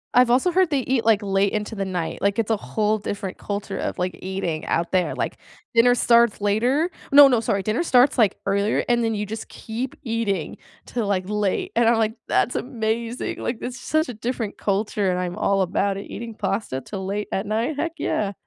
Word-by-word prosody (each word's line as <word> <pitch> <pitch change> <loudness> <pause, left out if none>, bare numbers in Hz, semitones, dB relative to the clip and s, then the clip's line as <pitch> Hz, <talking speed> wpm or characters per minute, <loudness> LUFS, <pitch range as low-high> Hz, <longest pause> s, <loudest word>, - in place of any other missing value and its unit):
I've 250 -1 +6
also 265 +9 +3
heard 370 0 +3
they 285 -4 +1
eat, 250 -3 0
like, 220 -2 +4
late 195 0 +1
into 210 +1 -2
the 195 -1 -2
night, 180 -3 -3
like, 200 +2 +1
it's 225 0 0
a 220 - +2
whole 215 +1 0
different 200 -2 -5
culture 205 0 -4
of, - - -3
like, 180 -1 -2
eating 185 -4 -3
out 170 - 0
there, 185 -2 +1
like, - - -3 0.4
dinner 245 +1 +5
starts 235 -2 +4
later. 245 - +1 0.2
No, 285 0 +10
no, 245 -3 +3
sorry, 200 -3 -1
dinner 215 - 0
starts, 260 -5 +4
like, 220 -6 +3
earlier 200 +2 +1
and 240 -1 +2
then 225 -1 0
you 210 - -2
just 220 +2 -7
keep 235 +4 -5
eating 225 - -2 0.3
till, 235 -4 -3
like, 190 -2 +1
late 210 -2 -1
and 230 0 +4
I'm 235 - +3
like, 220 -1 +1
"That's 245 - +1
amazing. 230 0 -2
Like, 235 -1 -3
this 250 - -5
is - - -11
such 315 +1 +1
a - - -4
different 230 -1 -4
culture 200 -1 0
and 180 - 0
I'm 180 -1 -3
all 195 -1 +1
about 195 +2 0
it. 200 - -6
Eating 230 -1 -6
pasta 195 - -2
till 190 -2 -6
late 205 +2 -3
at 195 - -1
night? 230 +8 -1
Heck, 335 +1 -1
yeah." 200 -1 -1
215 Hz, 215 wpm, -23 LUFS, 200-235 Hz, 0.4 s, No